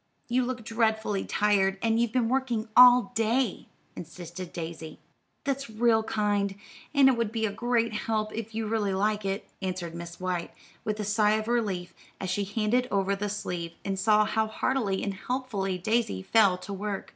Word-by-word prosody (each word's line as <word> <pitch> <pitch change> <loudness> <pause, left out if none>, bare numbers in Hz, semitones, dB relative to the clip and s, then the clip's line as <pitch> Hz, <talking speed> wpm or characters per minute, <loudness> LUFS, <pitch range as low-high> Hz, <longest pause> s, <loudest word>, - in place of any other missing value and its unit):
You 250 +1 +2
look 245 -2 -4
dreadfully 220 -3 0
tired, 195 -2 +2
and 225 0 +2
you've 235 -2 +1
been 245 -2 +1
working 245 -3 0
all 245 -3 +8
day," 225 0 0 0.3
insisted 175 +1 -8
Daisy. 160 -1 -6 0.5
"That's 275 -2 -2
real 220 0 +3
kind, 205 -2 0 0.4
and 280 -2 +6
it 265 - +5
would 230 -2 -1
be 225 -1 -1
a 210 - -1
great 230 +1 0
help, 215 0 -2
if 225 0 -6
you 225 0 -1
really 210 -3 0
like 210 +1 0
it," 195 +1 -2
answered 185 -3 -3
Miss 170 0 -8
White, 180 -2 -3 0.3
with 215 0 -2
a - - -1
sigh 210 +1 +3
of 215 0 -1
relief 195 -8 -1 0.3
as 185 - -3
she 205 - 0
handed 225 +4 0
over 200 0 +1
the 205 +1 -3
sleeve, 175 -4 -4
and 195 -1 -2
saw 215 +1 +4
how 220 +1 0
heartily 220 -3 -1
and 200 - -2
helpfully 205 -4 -3
Daisy 215 - 0
fell 200 - +4
to 185 +2 -7
work. 200 0 -4
215 Hz, 180 wpm, -28 LUFS, 195-230 Hz, 0.5 s, all